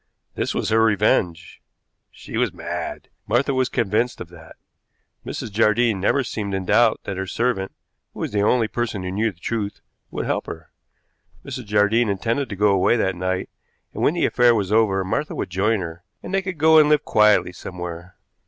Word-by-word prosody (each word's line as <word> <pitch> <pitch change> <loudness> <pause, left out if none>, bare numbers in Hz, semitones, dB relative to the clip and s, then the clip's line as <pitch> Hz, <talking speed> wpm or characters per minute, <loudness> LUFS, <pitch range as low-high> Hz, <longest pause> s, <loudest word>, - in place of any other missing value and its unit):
This - - -2
was - - -1
her 110 +1 +3
revenge. 95 -5 +1 0.5
She - - -10
was - - +1
mad; - - -6 0.2
Martha 125 +6 +1
was 130 -1 +1
convinced 120 +1 0
of 85 - -8
that. 80 -2 -14 0.7
Mrs. 110 - -6
Jardine 110 0 +2
never 135 +7 +2
seemed 100 -5 -4
in 95 -1 -3
doubt 115 +3 +3
that 100 - -5
her 95 0 -3
servant, 115 -3 -1 0.4
who - - -7
was - - -3
the 105 -1 0
only 115 +2 +2
person 110 -4 -3
who 90 - -4
knew 110 +3 0
the 85 - -26
truth, 105 +1 -3 0.3
would - - -4
help - - -2
her. - - -9 0.7
Mrs. 125 - -6
Jardine 105 +2 +2
intended 115 +7 -1
to 100 - -5
go 105 +2 +3
away 100 +4 +3
that 95 -4 0
night, 95 +1 -2 0.4
and - - -5
when 155 - +2
the 175 - +1
affair 120 -1 +4
was 100 -3 -1
over 105 -3 +3
Martha 150 +10 -2
would - - -4
join 100 +3 +1
her, 85 0 -7 0.2
and 185 - -7
they 195 - +2
could 185 -2 -5
go 160 +1 +6
and 150 -1 +5
live 150 -1 +3
quietly 105 -4 +4
somewhere. 90 -1 -8
105 Hz, 190 wpm, -22 LUFS, 95-120 Hz, 0.7 s, go